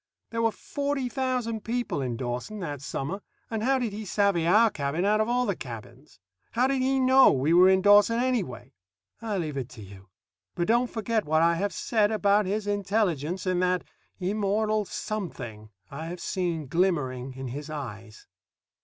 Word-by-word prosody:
There 230 Hz, 0 st, -1 dB
were 225 Hz, -1 st, +3 dB
forty 280 Hz, +4 st, -3 dB
thousand 250 Hz, -4 st, -2 dB
people 240 Hz, -, -2 dB
in 125 Hz, -3 st, -3 dB
Dawson 125 Hz, -, -4 dB
that 145 Hz, -6 st, -5 dB
summer, 150 Hz, +8 st, -4 dB, 0.3 s
and 220 Hz, -1 st, -2 dB
how 265 Hz, +4 st, +2 dB
did 240 Hz, -5 st, -2 dB
he 215 Hz, +1 st, -5 dB
savvy 200 Hz, -4 st, +1 dB
our 215 Hz, +5 st, +5 dB
cabin 150 Hz, +2 st, -2 dB
out 215 Hz, +1 st, +3 dB
of 215 Hz, -, 0 dB
all 250 Hz, +1 st, +2 dB
the 200 Hz, -5 st, 0 dB
cabins? 120 Hz, +2 st, -10 dB, 0.3 s
How 245 Hz, +2 st, +3 dB
did 265 Hz, 0 st, +1 dB
he 265 Hz, +1 st, +2 dB
know 260 Hz, +1 st, +6 dB
we 140 Hz, +5 st, +1 dB
were 180 Hz, +2 st, +7 dB
in 190 Hz, 0 st, +3 dB
Dawson, 205 Hz, +3 st, +6 dB
anyway? 195 Hz, -, -2 dB, 0.5 s
I 220 Hz, -3 st, -2 dB
leave 155 Hz, -5 st, -3 dB
it 130 Hz, -2 st, -4 dB
to 120 Hz, -4 st, -11 dB
you. 95 Hz, 0 st, -14 dB, 0.5 s
But 175 Hz, -, 0 dB
don't 240 Hz, +2 st, +3 dB
forget 220 Hz, -1 st, -1 dB
what 155 Hz, +2 st, +3 dB
I 170 Hz, 0 st, +4 dB
have 195 Hz, +4 st, -1 dB
said 215 Hz, -2 st, +1 dB
about 205 Hz, -1 st, +2 dB
his 205 Hz, +2 st, -1 dB
intelligence 195 Hz, -5 st, -1 dB
and 185 Hz, -1 st, +1 dB
that 180 Hz, 0 st, +1 dB, 0.4 s
immortal 210 Hz, +2 st, 0 dB
something 160 Hz, -, -5 dB, 0.2 s
I 155 Hz, +4 st, -6 dB
have 175 Hz, +1 st, -6 dB
seen 170 Hz, -5 st, -2 dB
glimmering 135 Hz, -6 st, 0 dB
in 130 Hz, -1 st, -6 dB
his 145 Hz, +4 st, -6 dB
eyes. 115 Hz, -7 st, -8 dB
190 Hz, 180 wpm, -27 LUFS, 145-220 Hz, 0.5 s, were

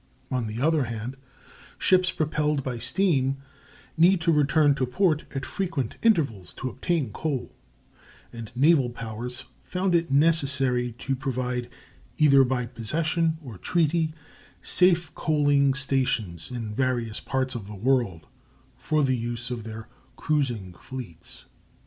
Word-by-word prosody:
On 125 Hz, -3 st, -1 dB
the 110 Hz, +2 st, -5 dB
other 155 Hz, 0 st, +2 dB
hand, 115 Hz, +3 st, -5 dB, 0.6 s
ships 185 Hz, -1 st, +3 dB
propelled 150 Hz, -3 st, 0 dB
by 125 Hz, -3 st, -4 dB
steam 135 Hz, -, +1 dB, 0.6 s
needed 175 Hz, +3 st, +5 dB
to 165 Hz, 0 st, +3 dB
return 150 Hz, -1 st, +4 dB
to 135 Hz, -2 st, -1 dB
port 165 Hz, +2 st, +1 dB
at 135 Hz, -, -3 dB
frequent 165 Hz, -, -3 dB
intervals 140 Hz, -, +1 dB
to 130 Hz, -, -4 dB
obtain 140 Hz, -2 st, -1 dB
coal, 140 Hz, +1 st, -3 dB, 0.8 s
and 115 Hz, -1 st, -8 dB
naval 140 Hz, -1 st, +4 dB
powers 120 Hz, +2 st, -5 dB, 0.2 s
found 185 Hz, 0 st, -1 dB
it 170 Hz, -2 st, +2 dB
necessary 140 Hz, -5 st, +2 dB
to 135 Hz, +3 st, -3 dB
provide, 125 Hz, -2 st, -3 dB, 0.5 s
either 140 Hz, -3 st, +6 dB
by 125 Hz, -1 st, 0 dB
possession 155 Hz, +8 st, 0 dB
or 115 Hz, -9 st, -9 dB
treaty, 160 Hz, -2 st, +1 dB, 0.5 s
safe 175 Hz, -4 st, +3 dB
coaling 145 Hz, -4 st, +2 dB
stations 130 Hz, -, 0 dB
in 115 Hz, -4 st, -5 dB
various 120 Hz, -3 st, -1 dB
parts 130 Hz, -1 st, -1 dB
of 110 Hz, -5 st, -6 dB
the 105 Hz, -, -8 dB
world 110 Hz, -7 st, 0 dB, 0.5 s
for 155 Hz, -1 st, 0 dB
the 130 Hz, -1 st, +2 dB
use 120 Hz, +1 st, -4 dB
of 115 Hz, -3 st, -5 dB
their 110 Hz, 0 st, -8 dB, 0.3 s
cruising 120 Hz, -11 st, -1 dB
fleets. 115 Hz, -11 st, -9 dB
135 Hz, 130 wpm, -26 LUFS, 120-155 Hz, 0.8 s, either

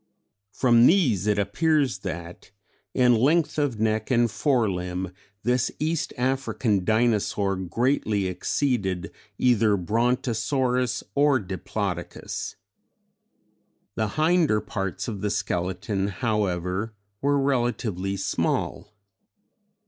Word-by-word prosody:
From 120 Hz, -2 st, +5 dB
these 125 Hz, -, +3 dB
it 105 Hz, -1 st, +2 dB
appears 140 Hz, -, +1 dB
that 85 Hz, -2 st, -7 dB, 0.5 s
in 125 Hz, -1 st, +5 dB
length 150 Hz, +6 st, +2 dB
of 135 Hz, -7 st, 0 dB
neck 110 Hz, 0 st, 0 dB
and 120 Hz, -3 st, +3 dB
fore 125 Hz, -2 st, +2 dB
limb 90 Hz, 0 st, -3 dB, 0.3 s
this 125 Hz, +1 st, +1 dB
East 155 Hz, +1 st, -1 dB
African 125 Hz, -5 st, 0 dB
Dinosaur 105 Hz, -2 st, +1 dB
greatly 105 Hz, +2 st, 0 dB
exceeded 95 Hz, 0 st, -1 dB, 0.3 s
either 115 Hz, -4 st, +3 dB
Brontosaurus 125 Hz, -, 0 dB
or 145 Hz, -1 st, +4 dB
Diplodocus. 95 Hz, -4 st, -4 dB, 1.4 s
The 110 Hz, 0 st, -1 dB
hinder 155 Hz, -7 st, +3 dB
parts 95 Hz, -2 st, -4 dB
of 105 Hz, -5 st, -4 dB
the 105 Hz, -, 0 dB
skeleton 95 Hz, 0 st, -2 dB
however, 100 Hz, -1 st, -1 dB, 0.3 s
were 145 Hz, +1 st, +2 dB
relatively 120 Hz, -8 st, -1 dB
small. 95 Hz, +2 st, -2 dB
110 Hz, 95 wpm, -25 LUFS, 95-130 Hz, 1.4 s, From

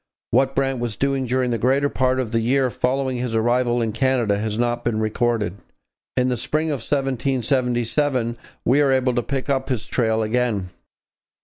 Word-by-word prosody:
What 135 Hz, +3 st, +2 dB
Brant 135 Hz, -1 st, 0 dB
was 120 Hz, -3 st, -3 dB
doing 135 Hz, -1 st, 0 dB
during 125 Hz, 0 st, 0 dB
the 115 Hz, -, -1 dB
greater 135 Hz, +5 st, +2 dB
part 130 Hz, -1 st, +1 dB
of 120 Hz, -4 st, -2 dB
the 115 Hz, -, +1 dB
year 130 Hz, +2 st, +2 dB
following 130 Hz, +1 st, -1 dB
his 120 Hz, -2 st, -2 dB
arrival 120 Hz, +1 st, +2 dB
in 110 Hz, -, -1 dB
Canada 120 Hz, -5 st, +1 dB
has 105 Hz, 0 st, -2 dB
not 120 Hz, 0 st, 0 dB
been 110 Hz, -2 st, 0 dB
recorded. 110 Hz, -3 st, 0 dB, 0.6 s
In 125 Hz, 0 st, +3 dB
the 125 Hz, -, 0 dB
spring 155 Hz, +7 st, -1 dB
of 145 Hz, -, 0 dB
1777 130 Hz, -1 st, 0 dB, 0.3 s
we 135 Hz, +5 st, +4 dB
are 140 Hz, -2 st, +3 dB
able 130 Hz, -1 st, +2 dB
to 120 Hz, -, +1 dB
pick 135 Hz, +1 st, -3 dB
up 135 Hz, -1 st, 0 dB
his 125 Hz, -5 st, -1 dB
trail 110 Hz, -2 st, +1 dB
again. 110 Hz, -4 st, 0 dB
125 Hz, 180 wpm, -22 LUFS, 115-135 Hz, 0.6 s, we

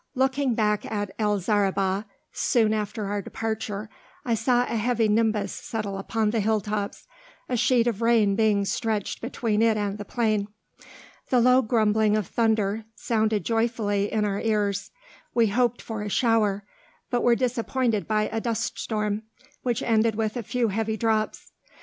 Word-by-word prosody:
Looking 265 Hz, -1 st, +1 dB
back 210 Hz, -2 st, 0 dB
at 205 Hz, -2 st, -2 dB
El 210 Hz, -1 st, +2 dB
Zaribah, 195 Hz, 0 st, +1 dB, 0.3 s
soon 225 Hz, -4 st, +2 dB
after 210 Hz, 0 st, -3 dB
our 205 Hz, +1 st, -2 dB
departure, 220 Hz, 0 st, -4 dB, 0.4 s
I 235 Hz, -, +1 dB
saw 240 Hz, +2 st, +2 dB
a 235 Hz, -, -3 dB
heavy 230 Hz, 0 st, +1 dB
nimbus 215 Hz, -2 st, +1 dB
settle 205 Hz, -3 st, -4 dB
upon 215 Hz, +1 st, 0 dB
the 230 Hz, -, 0 dB
hilltops, 210 Hz, -1 st, -1 dB, 0.4 s
a 250 Hz, -, -1 dB
sheet 245 Hz, 0 st, +3 dB
of 235 Hz, -3 st, -1 dB
rain 225 Hz, -4 st, +3 dB
being 210 Hz, -2 st, +2 dB
stretched 215 Hz, 0 st, -2 dB
between 225 Hz, -3 st, -1 dB
it 225 Hz, -1 st, +3 dB
and 205 Hz, 0 st, -2 dB
the -, -, -4 dB
plain. 215 Hz, -2 st, 0 dB, 0.8 s
The 250 Hz, -, +4 dB
low 250 Hz, +2 st, +5 dB
grumbling 215 Hz, -2 st, +2 dB
of 210 Hz, -, -1 dB
thunder 220 Hz, 0 st, 0 dB
sounded 215 Hz, -4 st, 0 dB
joyfully 225 Hz, -3 st, 0 dB
in 215 Hz, -1 st, +1 dB
our 200 Hz, -1 st, -1 dB
ears. 205 Hz, -2 st, 0 dB, 0.5 s
We 235 Hz, -1 st, +5 dB
hoped 240 Hz, +2 st, +1 dB
for 220 Hz, -2 st, -5 dB
a 210 Hz, -, -4 dB
shower, 210 Hz, -3 st, +2 dB, 0.5 s
but 245 Hz, -1 st, +1 dB
were 240 Hz, -1 st, +4 dB
disappointed 245 Hz, -2 st, 0 dB
by 215 Hz, -1 st, +2 dB
a 225 Hz, 0 st, -2 dB
dust 230 Hz, -2 st, -2 dB
storm, 210 Hz, -1 st, -1 dB, 0.4 s
which 245 Hz, 0 st, -1 dB
ended 225 Hz, -1 st, +2 dB
with 220 Hz, 0 st, -1 dB
a 245 Hz, -, -2 dB
few 235 Hz, +1 st, 0 dB
heavy 220 Hz, +2 st, -1 dB
drops. 220 Hz, -1 st, -1 dB
220 Hz, 160 wpm, -25 LUFS, 210-230 Hz, 0.8 s, low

